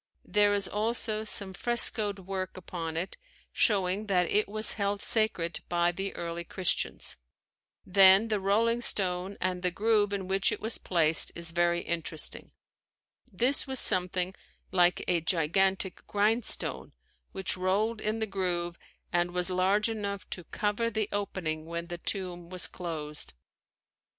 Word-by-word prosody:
There 205 Hz, 0 st, +3 dB
is 200 Hz, -1 st, +1 dB
also 215 Hz, 0 st, -1 dB
some 200 Hz, -3 st, +1 dB
frescoed 215 Hz, -1 st, +1 dB
work 190 Hz, -1 st, -4 dB
upon 165 Hz, -3 st, -6 dB
it 180 Hz, +4 st, -4 dB, 0.4 s
showing 200 Hz, 0 st, +1 dB
that 180 Hz, -3 st, +2 dB
it 210 Hz, 0 st, +2 dB
was 215 Hz, +1 st, +3 dB
held 200 Hz, -1 st, -2 dB
sacred 205 Hz, -7 st, +2 dB
by 175 Hz, 0 st, +2 dB
the 195 Hz, +3 st, -5 dB
early 170 Hz, 0 st, -5 dB
Christians. 180 Hz, +1 st, -2 dB, 0.7 s
Then 195 Hz, +3 st, +6 dB
the 210 Hz, -2 st, 0 dB
"rolling 225 Hz, +5 st, +1 dB
stone" 185 Hz, -3 st, +1 dB
and 185 Hz, -1 st, -2 dB
the 180 Hz, -, +1 dB
groove 205 Hz, +2 st, +1 dB
in 195 Hz, -2 st, -3 dB
which 195 Hz, +1 st, +2 dB
it -, -, -3 dB
was 220 Hz, +1 st, 0 dB
placed 165 Hz, -3 st, +3 dB
is 170 Hz, 0 st, -4 dB
very 175 Hz, 0 st, +1 dB
interesting. 165 Hz, -2 st, -2 dB, 0.8 s
This 245 Hz, +9 st, +1 dB
was 265 Hz, -1 st, +1 dB
something 180 Hz, 0 st, +3 dB, 0.4 s
like 175 Hz, -1 st, +3 dB
a 175 Hz, -2 st, +2 dB
gigantic 190 Hz, +3 st, 0 dB
grindstone 215 Hz, +3 st, +1 dB, 0.4 s
which 190 Hz, -1 st, -2 dB
rolled 205 Hz, +5 st, -1 dB
in 215 Hz, +1 st, -1 dB
the 220 Hz, -, -1 dB
groove 175 Hz, -4 st, -2 dB, 0.3 s
and 175 Hz, 0 st, +1 dB
was 180 Hz, +1 st, 0 dB
large 190 Hz, +4 st, +2 dB
enough 200 Hz, -3 st, -4 dB
to 180 Hz, -, -4 dB
cover 210 Hz, +5 st, -1 dB
the 215 Hz, -2 st, -2 dB
opening 165 Hz, -6 st, -3 dB
when 170 Hz, 0 st, -5 dB
the 175 Hz, 0 st, -7 dB
tomb 175 Hz, -3 st, -4 dB
was 185 Hz, -1 st, +3 dB
closed. 150 Hz, -, -6 dB
190 Hz, 145 wpm, -29 LUFS, 175-210 Hz, 0.8 s, Then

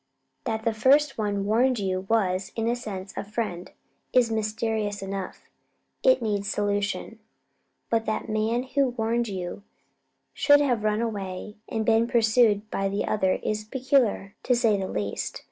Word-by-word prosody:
That 220 Hz, -2 st, -2 dB
the 230 Hz, -, +2 dB
first 270 Hz, +5 st, +3 dB
one 205 Hz, -2 st, -1 dB
warned 245 Hz, +4 st, +3 dB
you 190 Hz, -3 st, -1 dB
and 190 Hz, -, -12 dB
was, 190 Hz, -4 st, +1 dB
in 225 Hz, 0 st, -1 dB
a 235 Hz, -, +2 dB
sense, 195 Hz, -5 st, -6 dB
a -, -, -3 dB
friend, 205 Hz, -4 st, -4 dB, 0.4 s
is 245 Hz, -3 st, +4 dB
mysterious 215 Hz, -1 st, -1 dB
enough 195 Hz, -1 st, -6 dB, 0.5 s
it -, -, +4 dB
needs 205 Hz, -2 st, -1 dB
solution; 205 Hz, +1 st, -2 dB, 0.7 s
but 225 Hz, -1 st, +1 dB
that 215 Hz, -, -1 dB
the 220 Hz, -, -5 dB
man 225 Hz, +3 st, +1 dB
who 270 Hz, 0 st, +1 dB
warned 235 Hz, 0 st, -1 dB
you 185 Hz, -1 st, -5 dB, 0.7 s
should 290 Hz, 0 st, +5 dB
have 245 Hz, -7 st, +1 dB
run 215 Hz, +1 st, +1 dB
away 205 Hz, -2 st, -4 dB
and 220 Hz, -1 st, -1 dB
been 225 Hz, +1 st, +3 dB
pursued 220 Hz, -2 st, +3 dB
by 195 Hz, 0 st, 0 dB
the 200 Hz, +1 st, -1 dB
other 190 Hz, -3 st, +1 dB
is 215 Hz, 0 st, -1 dB
peculiar, 245 Hz, -4 st, +1 dB
to 250 Hz, -, +2 dB
say 230 Hz, -3 st, +3 dB
the 195 Hz, -1 st, -2 dB
least. 100 Hz, -, -3 dB
215 Hz, 160 wpm, -26 LUFS, 200-235 Hz, 0.7 s, should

